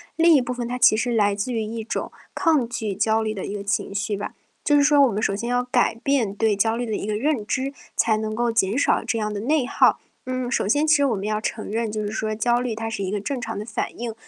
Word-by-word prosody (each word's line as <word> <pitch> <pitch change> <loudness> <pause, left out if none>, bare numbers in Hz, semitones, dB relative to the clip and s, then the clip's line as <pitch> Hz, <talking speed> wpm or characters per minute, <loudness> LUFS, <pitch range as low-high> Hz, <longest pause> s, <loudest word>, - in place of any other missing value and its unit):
另 335 0 +5
一 275 - +5
部 250 0 -3
分 240 -1 -4
它 250 - -3
其 215 - +6
实 240 +2 -1
来 205 -2 +3
自 200 +5 -3
于 225 - -1
一 225 +1 -5
种 225 - -4 0.2
抗 310 -9 +2
拒 220 -4 -3
焦 220 +3 +1
虑 215 - -2
的 195 - -5
一 205 - -5
个 200 - -5
情 200 0 -2
绪 205 +1 -1
吧， 200 - -5 0.3
就 295 - +3
是 290 - +5
说 290 0 +5
我 270 - +5
们 210 +2 -2
首 195 - +1
先 235 +4 -4
要 245 0 +1
改 250 -2 +1
变 235 -5 0
对 220 -1 +2
焦 225 +3 +1
虑 240 +1 -2
的 220 - -3
一 205 - -4
个 210 - -1
认 250 -2 0
知， 270 +3 -1 0.2
才 220 -1 +3
能 215 0 -3
够 240 0 +1
减 225 0 +1
少 285 - +2
这 230 - -1
样 210 -1 -2
的 205 - -3
内 275 +2 +1
耗。 - - +3 0.3
嗯， 255 -1 -3
首 200 - 0
先 290 +8 +2
其 310 -1 +5
实 285 - +3
我 240 -6 +1
们 195 - -5
要 215 0 -1
承 215 -2 -4
认， 225 -1 -1
就 215 0 -3
是 205 - -3
说 215 0 -2
焦 240 +2 +2
虑 245 -3 -2
它 225 +1 -4
是 220 -3 -4
一 185 - -2
个 210 - -2
正 250 +5 -4
常 225 -3 -4
的 210 - -5
反 215 - -4
应， 235 -1 -3
225 Hz, 310 characters per minute, -23 LUFS, 210-250 Hz, 0.3 s, 其